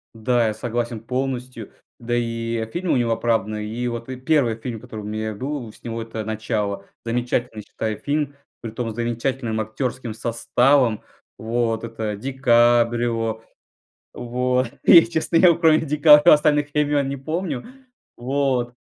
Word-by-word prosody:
Да, 115 +1 +1
я 110 - -1
согласен 120 0 -3
полностью. 125 -2 -4 0.3
Да 120 0 -2
и, 115 -1 -2
э, 110 - -9
фильмы 175 +4 -1
у - - +2
него 120 -2 +1
оправданы. 110 -2 -1
И 120 +3 -4
вот, 120 -1 -6
э, 130 - -5
1 130 -3 +1
фильм, 115 0 -6
который 110 -2 -9
у - - -10
меня 110 +1 -4
был 130 -1 -5
с - - -21
него- 115 -1 -4
это 115 -1 -6
"Начало". 105 -2 -3 0.2
Замечательный, 120 -1 -2
считаю, 110 +1 -4
фильм, 145 -1 -2 0.3
притом 115 0 -4
с - - -10
замечательным 120 0 -2
актерским 115 +2 -3
составом. 120 +1 +2 0.4
Вот. 115 0 -1
Это 110 -2 -4
ДиКаприо. 120 -2 +2 0.7
Вот. 125 +1 0 0.2
И, 170 -4 +9
честно, 165 0 0
вот 170 - -2
кроме 160 -2 +5
ДиКаприо 150 0 +7
остальных 150 -1 +2
имен 145 -2 +1
не 140 - -4
помню. 155 -1 -3 0.5
Вот. 130 -1 -1
120 Hz, 145 wpm, -22 LUFS, 115-135 Hz, 0.7 s, И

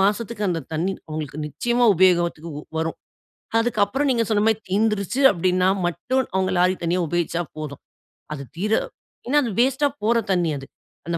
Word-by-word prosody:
மாசத்துக்கு 210 +2 0
அந்த 165 -2 -1
தண்ணி 170 +5 0 0.2
அவங்களுக்கு 155 -1 -5
நிச்சயமா 240 +9 0
உபயோகத்திக்கு 170 -2 +2 0.3
வரும். 160 0 -2 0.6
அதுக்கு 235 -1 -1
அப்புறம் 280 +6 -1
நீங்க 235 -2 +2
சொன்ன 210 -2 +2
மாரி 220 -1 +3
தீந்துருச்சு 210 +3 0
அப்படினா 185 0 +1 0.2
மட்டும் 245 +10 0
அவங்க 190 0 +1
லாரி 180 +1 +4
தண்ணி 170 +1 +1
உபயோகிச்சா 175 +1 -1 0.2
போதும். 150 -2 -6 0.5
அது 140 -2 -6
தீர 210 +5 0 0.5
ஏனா 290 +4 +2
அது 235 - -2
வேஸ்ட்டா 265 +3 +3 0.2
போற 230 +2 +3
தண்ணி 175 -3 +2
அது. 135 - -8 0.4
அந்த 170 0 -1
185 Hz, 155 wpm, -23 LUFS, 170-230 Hz, 0.6 s, லாரி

